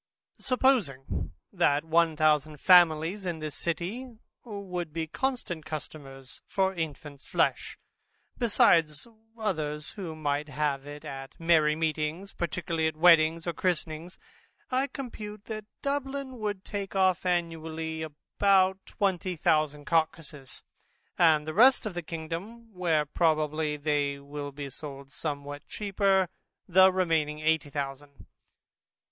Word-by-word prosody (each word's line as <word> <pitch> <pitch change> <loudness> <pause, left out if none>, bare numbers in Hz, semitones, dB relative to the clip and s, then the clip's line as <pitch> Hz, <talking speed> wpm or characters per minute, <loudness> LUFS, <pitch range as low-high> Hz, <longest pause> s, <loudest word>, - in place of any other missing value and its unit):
Supposing 240 - +1 0.2
that 150 -5 +2
one 165 0 +3
thousand 155 -1 +2
families 175 +2 +5
in 175 -3 -2
this 155 -2 -5
city, 205 - -3 0.3
would 185 -7 -5
be 165 +1 -2
constant 180 - -3
customers 145 -4 -8
for 190 -1 +1
infants 150 -4 -6
flesh, - - 0 0.6
besides 165 - +3 0.3
others 155 -8 -2
who 180 -6 -6
might 145 -1 -2
have 145 -1 -1
it 145 0 -9
at 135 +4 -8
merry 160 -2 +4
meetings, 160 +4 -2
particularly 165 -1 -1
at 160 - -3
weddings 165 -1 +5
and 170 - -2
christenings, 170 -1 -2 0.5
I 260 +2 +2
compute 215 -6 -8
that 215 -2 -6 0.2
Dublin 275 -2 -3
would 205 -3 -3
take 200 -1 -5
off 185 -2 +3
annually 160 -2 -2
about 190 +5 +1
twenty 185 -3 -1
thousand 155 -2 +1
carcasses; 155 -4 -1 0.5
and 155 -3 +4
the 155 - -3
rest 250 +7 +6
of 215 - -3
the 175 - -3
kingdom 175 +9 -7
(where 165 -5 +1
probably 155 -1 +1
they 145 -1 0
will 145 0 -7
be 140 -1 -7
sold 140 -1 -9
somewhat 145 -2 -5
cheaper) 195 -2 +1 0.4
the 190 +1 +7
remaining 160 -5 0
eighty 160 -1 +1
thousand. 140 0 -6
160 Hz, 120 wpm, -28 LUFS, 150-190 Hz, 0.6 s, the